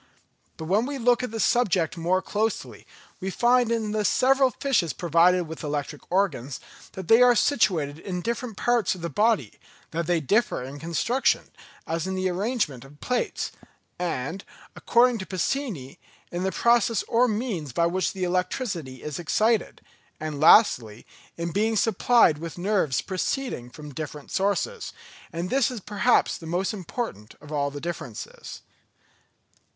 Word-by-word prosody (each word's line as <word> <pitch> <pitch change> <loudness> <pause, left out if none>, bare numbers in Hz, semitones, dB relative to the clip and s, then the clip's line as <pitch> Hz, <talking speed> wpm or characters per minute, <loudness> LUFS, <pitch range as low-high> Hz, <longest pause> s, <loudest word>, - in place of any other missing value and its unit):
But 160 - -6
when 205 +8 +1
we 285 0 -4
look 245 -1 +3
at 250 - -3
the 225 +1 -5
subject 190 -9 +2
more 180 +3 0
closely, 220 +1 -3 0.3
we 190 - -3
find 240 +3 +3
in 220 -2 -1
the 215 0 0
several 265 +6 +4
fishes 235 - 0
provided 175 +2 +3
with 160 0 -8
electric 145 0 -3
organs, 175 -9 0 0.3
that 190 -3 -7
these 225 +5 +6
are 250 -1 +7
situated 175 - +1
in 180 0 -4
different 235 -2 -3
parts 240 -6 +1
of 180 - -11
the 170 - -4
body, 210 - +1 0.3
that 165 0 -2
they 175 -1 +2
differ 200 - +1
in 135 +3 -8
construction, 195 - 0 0.3
as 165 +2 -2
in 190 - -2
the 185 0 0
arrangement 185 - -1
of 135 +1 -14
the - - -20
plates, 250 -1 -1 0.5
and, 175 +1 -3 0.3
according 240 0 +3
to 190 - -6
Pacini, 185 - -3 0.3
in 175 - -3
the 190 +1 0
process 235 -1 +2
or 245 +2 +3
means 210 - -2
by 170 +8 +1
which 185 +2 0
the 190 -2 -5
electricity 180 - -2
is 150 0 -5
excited—and 175 -6 -2
lastly, 125 - +5 0.3
in 170 0 -3
being 220 +5 +1
supplied 220 -5 +4
with 165 +1 -7
nerves 180 -8 +1
proceeding 190 - -3
from 150 +3 -10
different 150 0 -7
sources, 205 - -1 0.4
and 175 +1 -4
this 270 -3 +3
is 250 -3 -5
perhaps 210 +4 +1
the 165 - -9
most 180 +5 -1
important 185 - -6
of 150 +1 -13
all 140 -1 0
the 145 0 -7
differences. 150 -8 -7
185 Hz, 155 wpm, -25 LUFS, 160-230 Hz, 0.5 s, are